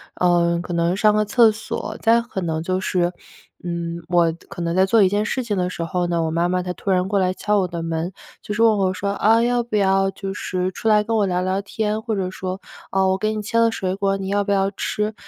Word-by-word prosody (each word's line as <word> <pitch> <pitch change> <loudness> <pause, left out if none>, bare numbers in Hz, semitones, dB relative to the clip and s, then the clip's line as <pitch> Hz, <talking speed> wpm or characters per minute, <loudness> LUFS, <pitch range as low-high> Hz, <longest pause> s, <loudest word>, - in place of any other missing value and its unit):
呃， 170 -1 +2
可 - - -7
能 170 +1 +1
上 210 +1 +4
个 215 0 +2
厕 230 0 +5
所， 215 - -5
再 230 +1 +4
可 235 -5 -6
能 160 -2 -2
就 185 +1 -1
是， 180 -1 0 0.5
嗯， 170 -1 -4
我 170 -2 +3 0.2
可 175 - -8
能 170 0 -1
在 190 +1 +4
做 215 +1 +4
一 185 - +4
件 205 +2 0
事 255 +2 -2
情 210 -4 -2
的 180 0 0
时 170 - -4
候 175 +2 -1
呢， 170 -1 0
我 160 - -1
妈 170 +2 +1
妈 180 0 0
她 180 - -3
突 195 - -6
然 185 +1 +1
过 200 -1 +1
来 185 0 +1
敲 210 +1 0
我 185 - 0
的 170 -1 -5
门， 165 +2 -3 0.3
就 210 - -5
是 225 +2 +2
问 220 -2 +5
我 190 -1 +1
说： 200 +2 -3
“啊， 225 +3 +3
要 245 0 +2
不 230 -2 -5
要 195 -1 +3
就 195 0 -6
是 185 -1 -2
出 225 - -5
来 210 -1 +5
跟 225 +1 -1
我 205 - +3
聊 180 0 0
聊 190 +2 -1
天？” 215 +1 -2
或 220 -2 -2
者 185 -1 -2
说： 185 0 -5 0.3
“哦， 190 0 +2
我 190 - +1
给 215 +1 -1
你 215 - -3
切 230 +3 0
了 230 0 +4
水 190 -4 -2
果， 195 0 0
你 195 0 -5
要 205 0 +1
不 200 - -1
要 195 0 +1
吃？” 210 +1 -2
190 Hz, 285 characters per minute, -21 LUFS, 180-210 Hz, 0.5 s, 厕